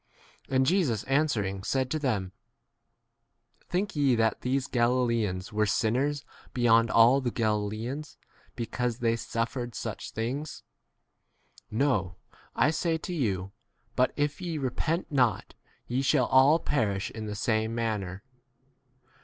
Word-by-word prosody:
And 130 -1 +3
Jesus 155 - +1
answering 120 -10 0
said 130 +5 -1
to 155 - 0
them, 105 -10 -1 1.4
Think 190 +2 -1
ye 140 -4 +3
that 110 -1 +1
these 130 +1 0
Galileans 115 -7 0
were 105 0 +2
sinners 130 +8 0 0.3
beyond 115 -2 +4
all 120 +5 +6
the 125 - -1
Galileans 110 +6 -2 0.4
because 120 0 -2
they 115 -2 +1
suf 115 0 -2
3 130 - -3
fered 120 - -13
such - - -5
things? 130 +7 -4 1.1
No, 110 -7 0 0.4
I 130 +6 +3
say 165 +1 0
to 180 +3 -6
you, 100 - -1 0.4
but 125 - +3
if 145 +3 -1
ye 170 -3 -3
repent 150 +6 -2
not, 125 -6 +1 0.3
ye 125 +2 -1
shall 135 - +3
4 - - -6
all 135 +4 +7
perish 105 - -1
in 110 -1 -6
the 105 - -4
same 110 +1 0
manner. 105 -5 -3
120 Hz, 135 wpm, -28 LUFS, 110-140 Hz, 1.4 s, all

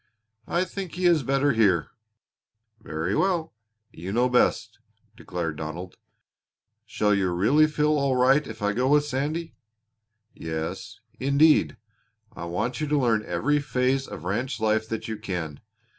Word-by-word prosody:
"I 175 - +1
think 190 -2 -6
he 180 0 -2
is 170 -3 +5
better 135 +2 +2
here." 100 -8 +2 0.9
"Very 80 +1 -3
well. 170 - 0 0.4
You 90 +4 -7
know 120 +4 +2
best," 125 0 +1 0.4
declared 80 -3 -4
Donald. 80 +4 -6 0.9
"Shall 105 -1 +1
you 95 -2 +1
really 120 +13 +4
feel 150 0 +1
all 140 -2 +1
right 135 +4 +3
if 110 -1 -8
I 105 0 +1
go 125 +4 0
with 145 +1 +4
Sandy?" 150 +4 -3 0.8
"Yes, 80 0 -5 0.2
indeed. 140 +4 +3 0.6
I 85 - -6
want 90 - -3
you 155 - -1
to 150 0 +1
learn 115 -4 +2
every 135 +13 +1
phase 130 0 0
of 75 - -8
ranch 120 +8 -2
life 110 0 +1
that 115 0 -4
you 110 -1 -4
can. 90 -8 -5
125 Hz, 145 wpm, -25 LUFS, 95-145 Hz, 0.9 s, is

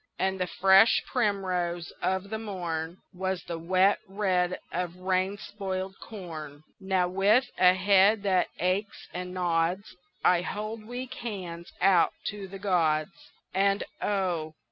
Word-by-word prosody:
And 190 0 0
the 180 - 0
fresh 195 +5 +5
primrose 185 -7 -1
of 190 +2 -1
the 220 - -2
morn 175 -5 -4 0.2
Was 185 0 -2
the 170 -1 -5
wet 185 +4 +3
red 185 -2 0
of 175 0 -3
rain 185 +2 0
spoiled 190 -2 -4
corn. 155 -8 -8 0.2
Now, 190 -2 +1
with 200 +7 +3
a 180 0 +6
head 200 +2 +4
that 185 -3 +2
aches 185 +4 -1
and 180 +1 -5
nods 180 +1 0 0.3
I 180 -1 +5
hold 215 +3 -5
weak 250 +1 -5
hands 180 -7 -6
out 185 -2 +4 0.2
to 200 -1 -7
the 195 +1 -8
gods; 170 -5 +1 0.4
And 195 +1 +2 0.2
oh! 175 -6 -1
190 Hz, 135 wpm, -28 LUFS, 180-200 Hz, 0.4 s, a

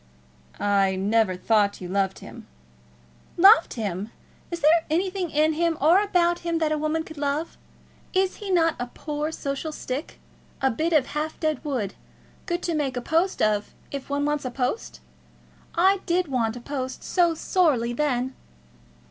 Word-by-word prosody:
"I 195 -2 +2
never 205 0 +2
thought 205 +1 +2
you 180 - -6
loved 195 +1 0
him." - - -11 0.9
"Loved 390 +6 +6
him! 205 -3 -3 0.4
Is 340 -1 -5
there 320 +3 +5
anything 365 +2 0
in 305 +1 +2
him 330 0 0
or 335 +7 +5
about 350 -4 +2
him 335 -1 -1
that 315 -2 0
a 310 - +1
woman 310 +1 0
could 315 -2 -11
love? 290 +3 -2 0.6
Is 380 0 +1
he 410 - -7
not 330 -3 +3
a 245 - -3
poor 300 0 -4
social 280 +1 -4
stick; 280 0 -5 0.4
a 265 -1 +2
bit 320 +8 -1
of 300 -5 +4
half 305 +2 -4
dead 310 -4 -1
wood, 250 -10 -2 0.5
good 345 -1 -2
to 340 - -1
make 280 -5 -1
a - - +1
post 330 +8 +1
of, 210 -1 0 0.2
if 280 -1 -6
one 285 0 0
wants 295 0 0
a 255 - -2
post? 250 - -3 0.7
I 380 +3 +4
did 350 0 +1
want 230 -4 0
a - - -9
post 260 0 -5
so 345 -3 +2
sorely 295 -9 +1
then!" 260 -2 0
300 Hz, 165 wpm, -25 LUFS, 245-335 Hz, 0.9 s, Loved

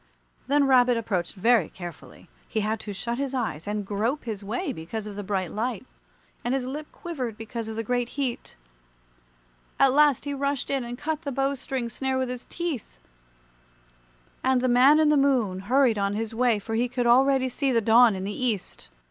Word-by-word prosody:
Then 285 +1 +3
Rabbit 250 -2 +4
approached 200 -6 -2
very 225 -2 +3
carefully. 175 -2 -10 0.2
He 220 - -1
had 215 +1 -1
to 210 - -6
shut 235 +6 -3
his 275 -1 -2
eyes 215 -10 -3
and 210 0 -2
grope 220 +9 -1
his 215 -4 -5
way 250 - -3
because 210 +5 -6
of 210 -1 -7
the 205 - -4
bright 190 -3 -2
light, 225 0 -3 0.6
and 245 +2 0
his 265 -2 -2
lip 295 +4 -6
quivered 255 -11 -5
because 225 0 -6
of 220 - -5
the 225 - -2
great 245 +1 -1
heat. 260 -4 -3 1.2
At 270 -1 +5
last 295 -2 +4
he 285 - -2
rushed 280 -1 -2
in 270 -2 0
and 240 +1 -6
cut 310 +2 -3
the 285 -4 -4
bow 275 +1 0
string 265 -2 -3
snare 265 +3 -2
with 260 -1 -1
his 250 -1 -6
teeth, 320 - -5 1.5
and 260 -1 +3
the 255 - +1
Man 260 +5 +6
in 310 -1 +4
the 300 - +4
Moon 250 -9 +2
hurried 240 +2 +2
on 200 0 0
his 225 +1 -3
way, 240 -1 +2
for 205 +2 -6
he 235 +2 +1
could 250 -1 -1
already 260 +2 +4
see 270 +2 -1
the 235 - +3
dawn 230 0 +5
in 190 - -4
the 200 +2 -3
East. 215 -7 -3
245 Hz, 200 wpm, -26 LUFS, 215-270 Hz, 1.5 s, Man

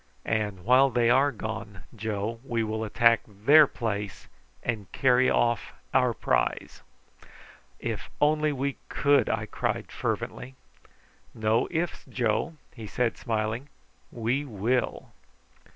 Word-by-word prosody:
"And 105 -4 -2
while 130 +3 +6
they 120 -1 +2
are 135 +3 +4
gone, 110 -4 -6
Joe, 110 +1 -3
we 120 -4 -1
will 110 0 -2
attack 115 +2 +4
their 140 +9 +6
place 105 -6 -4 0.4
and 110 -5 -3
carry 130 -1 +3
off 120 -1 +1 0.2
our - - +4
prize!" - - -1 1.0
"If - - -4
we - - -28
only 150 -3 0
could!" 145 0 +3
I - - -1
cried - - -3
fervently. 130 +1 -4 0.8
"No 110 +1 +1
ifs, 170 0 -2
Joe," 120 +4 -1 0.2
he 110 -3 -8
said 120 +2 0
smiling; 115 +4 -2 0.4
"we 120 +5 -1
will!" 120 0 -1
115 Hz, 120 wpm, -27 LUFS, 110-130 Hz, 1.0 s, while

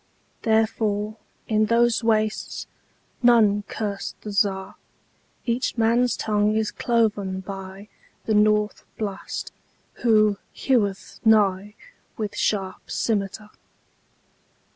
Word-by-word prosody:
Therefore, 220 -1 +1 0.3
in 215 -1 +2
those 235 0 +3
wastesNone 215 -1 0
curse 205 -2 -4
the 210 - -6
Czar.Each 200 +5 -3
man's 235 +2 +2
tongue 210 0 +1
is 220 -1 0
cloven 205 -5 0
byThe 195 +1 -8 0.4
North 210 0 +2
Blast, 205 -3 -4 0.5
who 215 -3 +4 0.2
heweth 205 -7 0
nighWith 210 - 0
sharp 195 -3 -2
scymitar. 210 -1 -2
215 Hz, 75 wpm, -24 LUFS, 200-225 Hz, 0.5 s, who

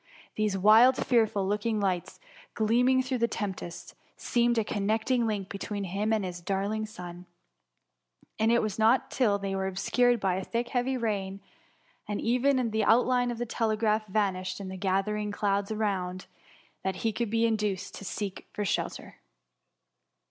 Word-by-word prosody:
These 210 -2 0
wild, 220 +6 +6
fearful 220 -5 +2
looking 210 +2 0
lights, 185 -3 -2 0.4
gleam 230 +3 +3
ing 260 0 +3
through 255 -1 -2
the 235 - +3
tempest, 190 -6 -5 0.2
seemed 240 -1 +1
a 225 - +3
connecting 220 +4 0
link 205 -3 -2
between 200 +1 -4
him 200 +4 -1
and 215 -3 +1
his 175 -1 -6
darling 200 +4 -2
son; 180 -4 -9 1.1
and 220 +1 +3
it 235 -1 +3
was 215 0 -3
not 225 +4 +3
till 215 -6 +2
they 195 -1 -3
were 190 0 -1
obscured 240 +6 +2
by 190 -2 0
the 190 - -6
thick 240 +1 -2
heavy 255 +1 0
rain, 200 -4 -2 0.7
and 205 -1 -2
even 250 0 +2
the 220 0 +1
outline 245 +2 +3
of 240 - -3
the 240 - -2
tele 225 -2 -1
graph 215 0 +1
vanished 190 -2 -1
in 195 -1 -6
the 190 - -6
gathering 200 +2 -1
clouds 200 -1 0
around, 190 -4 -2 0.6
that 190 -1 -1
he 225 - +2
could 235 -1 -2
be 230 +1 +2
induced 210 -4 -1
to - - -9
seek 200 0 -5
for 205 - -3
shelter. - - -3
210 Hz, 165 wpm, -28 LUFS, 195-230 Hz, 1.1 s, wild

